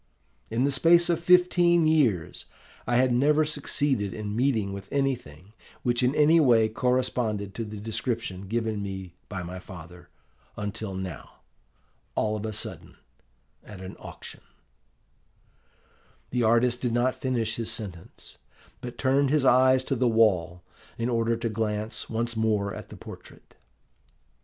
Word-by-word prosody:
In 115 +3 0
the 140 - +2
space 170 +5 +4
of 170 - 0
fifteen 175 -1 +4
years 130 - +1 0.4
I 120 - +1
had 130 +1 +4
never 150 +5 +3
succeeded 140 -7 -1
in 105 -1 -4
meeting 115 -6 +1
with 100 -1 -9
anything 110 - -2 0.3
which 120 0 +1
in 125 +3 +2
any 155 +2 +5
way 115 -7 +4
corresponded 120 -4 -1
to 115 - -4
the 105 -1 -7
description 110 -3 -3
given 110 -1 -1
me 95 -3 -6 0.2
by 95 -3 -4
my 90 +2 -7
father, 90 -1 -12 0.5
until 105 -1 -4
now, 95 -5 -7 0.7
all 110 0 0
of 110 +1 -4
a - - -3
sudden, - - -7 0.7
at 105 -3 -11
an 95 0 -8
auction - - -10 1.0
" - - -36
The 125 - 0
artist 120 +2 +3
did 120 -2 -1
not 125 +2 +2
finish 125 -4 -2
his 115 -2 -2
sentence, 100 -6 -6 0.4
but 125 -1 -7
turned 135 +1 +2
his 145 -1 +2
eyes 130 +1 +5
to 135 - -1
the 125 0 +2
wall 90 -6 +2 0.3
in 115 +1 -1
order 115 -1 +1
to 115 0 -2
glance 110 0 -3
once 115 0 -2
more 105 -3 0
at - - -9
the - - -10
portrait. - - -13
115 Hz, 145 wpm, -27 LUFS, 105-130 Hz, 1.0 s, any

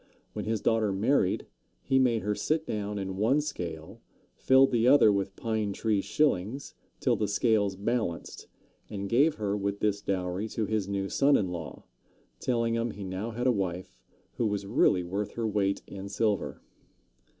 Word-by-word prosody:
When - - -4
his 110 -2 -1
daughter 110 -3 +2
married, 100 0 +1 0.4
he 135 - +2
made 120 -4 +2
her 105 +1 0
sit 155 +8 -1
down 105 -1 -3
in 95 -1 -4
one 115 +8 +3
scale, 85 - -6 0.3
filled 130 +1 +4
the 120 -1 +2
other 130 -5 +7
with 100 -1 -1
"pine 110 -3 -2
tree 105 -1 0
shillings" 135 -2 0 0.3
till - - +2
the 105 - -1
scales 100 -1 +2
balanced, 100 -4 -3 0.4
and 100 -2 -4
gave 140 +8 +3
her 105 -2 -1
with 100 0 -2
this 100 -1 0
dowry 95 +1 -2
to 110 - -2
his 105 -2 -1
new 100 -1 -2
son 140 +7 +3
in 95 - -1
law, 85 -4 -7 0.6
telling 115 -2 0
him 115 +1 0
he 105 -2 -7
now 95 +4 -4
had 120 +2 -4
a 130 - +5
wife 95 -4 -3 0.4
who 115 - +1
was 100 -1 -2
really 100 -3 +3
worth 100 +4 -3
her 115 - -3
weight 100 -2 0
in 100 0 -8
silver. 105 0 -1
105 Hz, 170 wpm, -28 LUFS, 95-115 Hz, 0.6 s, other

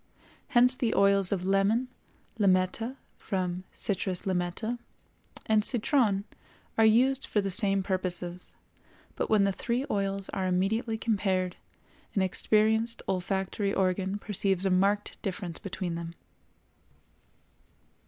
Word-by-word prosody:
Hence 250 +1 +4
the 245 -3 -1
oils 200 -1 +4
of 185 -2 -1
lemon, 195 +6 +2 0.5
limetta 195 +5 +1 0.2
(from 185 -1 -3
Citrus 190 -2 -2
Limetta), 190 +6 -2 0.7
and 215 -1 +3
citron 225 -4 +2 0.5
are 225 0 +5
used 255 +5 +3
for 210 - +1
the 195 -1 -1
same 195 -1 +4
purposes; 180 -2 -3 0.6
but - - -2
when 215 -2 +4
the 195 - +2
three 240 +6 -2
oils 195 -1 -1
are 190 -1 -2
immediately 215 +5 0
compared, 190 -5 0 0.6
an 195 - +3
experienced 220 +4 +2
olfactory 195 +2 -1
organ 190 +1 0
perceives 195 -2 -1
a 190 - +2
marked 200 +3 +1
difference 180 -3 -4
between 185 -2 -4
them. 170 0 -6
195 Hz, 115 wpm, -28 LUFS, 185-220 Hz, 0.7 s, are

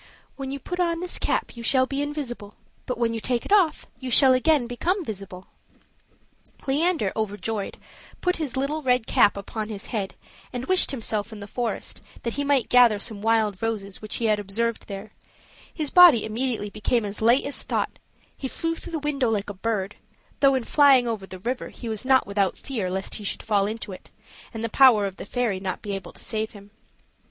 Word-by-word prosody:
"When 270 -1 -5
you 275 - -3
put 355 +7 -5
on 335 -2 +1
this 360 0 -4
cap - - -1
you 235 - -8
shall 260 +2 +3
be 275 +2 -3
invisible; 260 -8 -5 0.3
but 250 - -2
when 230 -1 +1
you 225 - -2
take 240 +1 -1
it - - -8
off 380 -6 +3
you 260 - -5
shall 260 +2 +6
again 280 +1 +3
become 340 +10 -1
visible." 195 -4 -7 1.2
Leander, 295 - +1
overjoyed, 215 -1 -3 0.4
put 360 0 0
his 290 -6 -3
little 285 +4 -1
red 250 -4 +2
cap 205 - +4
upon 215 +2 -5
his 205 -2 -6
head 200 -4 -2 0.4
and 250 0 -4
wished 370 0 +3
himself 220 -4 -2
in 215 - -8
the 200 - -7
forest, 235 +3 -4 0.2
that 235 - -2
he 285 - -1
might 280 -5 +2
gather 245 -4 +6
some 205 0 -4
wild 220 -3 +1
roses 210 -4 -3
which 215 - -3
he 230 - 0
had 215 -1 +3
observed 220 +3 -2
there: 200 +1 -7 0.6
his 305 -4 -3
body 350 -11 +8
immediately 225 -2 -2
became 220 +2 0
as 205 +1 -6
light 235 +4 +5
as 280 - -1
thought; - - -2 0.4
he 270 - -4
flew 330 +5 -2
through 330 - -8
the - - 0
window 285 -4 0
like 205 -2 -1
a - - -8
bird; 200 0 -2 0.4
though, 275 -1 +5
in 260 - 0
flying 270 -2 +5
over 215 -4 -3
the 185 - -8
river, 245 +7 -3
he 240 - -9
was 220 -2 -2
not 260 0 +4
without 200 -1 0
fear 225 -10 -3
lest 190 +1 -4
he 210 - -9
should 200 - -3
fall 205 -2 +2
into 220 -1 -5
it, 185 - -11 0.4
and 225 -1 -6
the - - +1
power 230 -4 +6
of 195 -1 -5
the - - -7
fairy 225 -4 -1
not 190 -1 -4
be 205 - -4
able 195 -1 -5
to - - -12
save 220 -1 -3
him. 205 -1 -14
230 Hz, 205 wpm, -25 LUFS, 205-270 Hz, 1.2 s, body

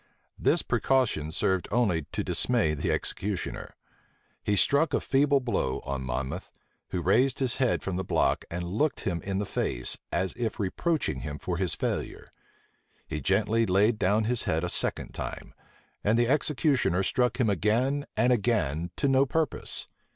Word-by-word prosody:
This - - +2
precaution 125 - +1
served 95 +3 0
only 90 -11 +1
to - - -2
dismay 115 -11 +2
the 75 - -1
executioner. 100 -1 -3 0.7
He 105 - 0
struck 145 +7 +3
a - - +2
feeble 140 +1 +2
blow 115 - -1
on 70 -1 -3
Monmouth, 65 +1 -4 0.4
who 90 -2 -3
raised 120 +9 +3
his 130 -3 0
head 130 -2 +1
from 95 -2 -3
the 95 - -2
block, - - +1
and 90 +1 -4
looked 110 - -1
him 85 -4 -2
in 95 +2 -3
the 100 - -1
face, - - -1
as 95 +2 -1
if 115 -2 -3
reproaching 100 - -1
him 75 +3 -5
for 85 +4 -4
his 90 -2 0
failure. - - -4 0.7
He 75 - -5
gently 110 - +1
laid 105 +4 +3
down 105 +4 +2
his 120 +2 0
head 80 +1 0
a 90 - -1
second - - -1
time; - - -6 0.5
and 110 +3 +2
the 120 0 +3
executioner 140 - +1
struck 125 +6 0
him 120 - +3
again 120 - 0
and 125 +1 +4
again 90 - 0
to 140 - 0
no 135 0 +3
purpose. 160 +2 +4
105 Hz, 165 wpm, -27 LUFS, 85-125 Hz, 0.7 s, and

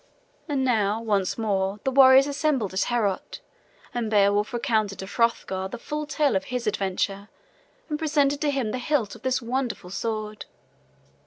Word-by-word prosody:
And 270 -2 0
now 215 -4 +1
once 205 -5 0
more 200 -2 -1
the 265 - 0
warriors 265 0 +7
assembled 280 -8 -1
in 190 - -1
Heorot, 210 -6 -1 0.5
and 235 -2 -2
Beowulf 205 0 +3
recounted 220 -5 0
to 190 - -6
Hrothgar 190 -3 0
the 215 - -7
full 300 +5 -5
tale 290 -5 +1
of 190 - 0
his 250 -2 -3
adventure 200 0 -2 0.6
and 300 -1 -3
presented 290 -2 +1
to 300 - +1
him 265 -6 -1
the 255 - -3
hilt 250 -6 0
of 230 - -12
the 260 0 0
wonderful 245 -7 -3
sword. 215 0 -4
230 Hz, 160 wpm, -25 LUFS, 205-270 Hz, 0.6 s, warriors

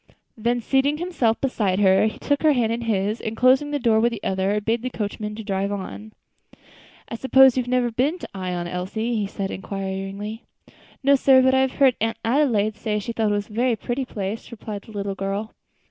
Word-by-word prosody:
Then, 235 +2 0
seating 270 +5 +1
himself 310 -10 0
beside 210 -8 0
her, 195 +1 +4
he 215 - -5
took 285 -1 -1
her 310 -2 +5
hand 235 -4 +1
in 230 +1 -2
his; 215 -1 -1
and, 220 0 -4
closing 260 +3 +4
the 290 - -1
door 230 -5 +3
with 235 +2 +2
the 225 -3 -7
other, 190 +2 0
bade 225 +2 -1
the 255 - -3
coachman 210 -2 -4
drive 200 -2 -2
on. 205 +2 -6 0.9
"I - - -8
suppose 265 +2 +5
you 255 - +2
have 245 - -8
never 250 -1 +1
been 270 +9 0
to - - -8
Ion, 180 -2 -3
Elsie?" 190 +7 -3
he 210 -3 -1
said, 195 0 -4
inquiringly. 195 +3 -5 0.6
"No, 280 +1 +5
sir; 270 -1 +5
but 260 0 +4
I 265 - +4
have 265 -1 +1
heard 265 -3 +3
Aunt 225 +1 0
Adelaide 225 -5 +2
say 210 -1 -2
she 210 +3 -4
thought 220 -2 0
it 205 -1 -1
a - - -14
very 240 +1 +1
pretty 245 +5 -3
place," 205 -1 -5
replied 215 -3 -7
the - - -13
little 200 -1 -3
girl. 195 +3 -3
220 Hz, 205 wpm, -23 LUFS, 200-255 Hz, 0.9 s, her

